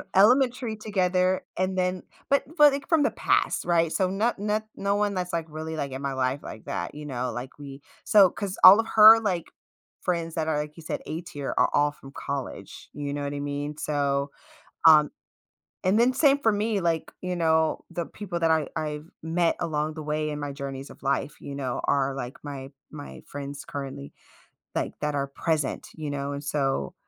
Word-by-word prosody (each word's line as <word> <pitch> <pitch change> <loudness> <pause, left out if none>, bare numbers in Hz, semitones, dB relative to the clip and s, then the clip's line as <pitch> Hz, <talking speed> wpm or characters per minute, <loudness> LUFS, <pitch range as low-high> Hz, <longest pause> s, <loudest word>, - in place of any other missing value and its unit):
elementary 245 +2 +4
together 185 -3 +1 0.2
and 185 0 0
then 180 0 0 0.3
but 280 - +3
but, 295 -1 +8
like, 280 0 -4
from 325 -3 +4
the - - +2
past - - +1
right 165 -2 +2
so 185 -1 +1
no 215 +5 +1
not 210 +2 -1
no 200 +1 0
one 205 -1 +1
that's, 180 -1 -3
like, 165 -1 -1
really, 160 +1 -5
like, 140 -2 -3
in 135 +1 -5
my 140 -1 -2
life 130 +2 -1
like 110 - -9
that, 85 +7 -4
you 150 0 -8
know, 125 -3 -3
like, 125 +3 -7
we 140 -1 -9 0.2
so 200 -3 +6
cause 200 -1 -5
all 195 +4 +11
of 225 - 0
her, 220 +1 +10
like, 185 -6 -1 0.6
friends 170 -2 -2
that 160 -1 -1
are, 150 - +1
like 150 0 -5
you 165 - -11
said, - - -4
A 160 +3 -4
tier 145 -5 -5
are - - +4
all 145 0 +3
from 135 -2 -14
college, 130 -8 -6
you 145 -1 -4
know 145 0 -3
what 140 0 -3
I 145 - -4
mean? 145 +1 -4
So, 140 -1 0 0.6
um, 150 -2 +7 0.7
and 190 +4 +3
then 250 +2 +4
same 280 0 +4
for 225 -5 +3
me, 210 -1 0
like, 165 -2 0
you 180 -1 -2
know, 160 -1 +2
the 170 -1 -3
people 185 -5 -6
that 165 -1 +3
I 160 -2 +2
I've 150 -1 -3 0.2
met 165 +1 +1
along 155 -2 -1
the 155 -1 -7
way 155 0 -1
in 150 0 -4
my 145 -1 -3
journeys 140 -1 -6
of - - -14
life, 140 +1 -1
you 140 - -7
know, 130 -3 -3
are, 140 -1 +1
like, 125 -1 -5
my 135 -2 -7 0.2
my 145 -2 -9
friends 140 0 -7
currently, 135 - -6 0.6
like, - - -1
that 150 0 -1
are 140 -1 -1
present, 150 0 -2
you 155 -2 -5
know, 140 0 -3
and 140 +1 -6
so, 135 - -1
155 Hz, 205 wpm, -26 LUFS, 140-185 Hz, 0.7 s, all